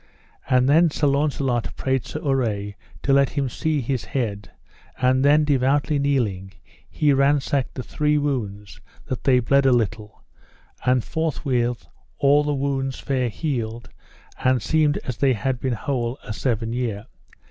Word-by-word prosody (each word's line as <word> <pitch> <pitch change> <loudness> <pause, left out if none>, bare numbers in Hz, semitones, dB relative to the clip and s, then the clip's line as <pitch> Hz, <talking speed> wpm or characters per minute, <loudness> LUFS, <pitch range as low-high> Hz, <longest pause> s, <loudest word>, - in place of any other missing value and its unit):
And 125 0 +4
then 160 +4 +5
Sir 150 - -1
Launcelot 140 -4 0
prayed 130 -2 -1
Sir 155 - -6
Urre 110 -7 0 0.3
to 140 - +2
let 140 0 +4
him 140 -2 -1
see 155 +4 -1
his 130 0 -2
head; 105 -7 -3 0.5
and 130 +1 +3
then 150 +2 +5
devoutly 145 +1 +1
kneeling 110 -10 -1 0.4
he 145 -2 +2
ransacked 140 -1 +1
the 130 - -4
three 150 +2 0
wounds, 105 -9 -3 0.2
that 130 - -5
they 130 -2 +5
bled 140 +3 +3
a - - +5
little, 110 -2 -1 0.6
and 125 -1 +2
forthwith 130 -7 -1 0.3
all 145 +1 +4
the 150 - -1
wounds 135 -1 -2
fair 130 -3 -1
healed, 120 -3 -4 0.5
and 130 -3 +2
seemed 155 -2 +2
as 125 -3 -4
they 135 -2 +3
had 125 +3 -2
been 130 -1 -1
whole 120 +1 -2
a 110 - -5
seven 115 -1 -1
year. 115 -4 -3
130 Hz, 150 wpm, -23 LUFS, 120-140 Hz, 0.6 s, then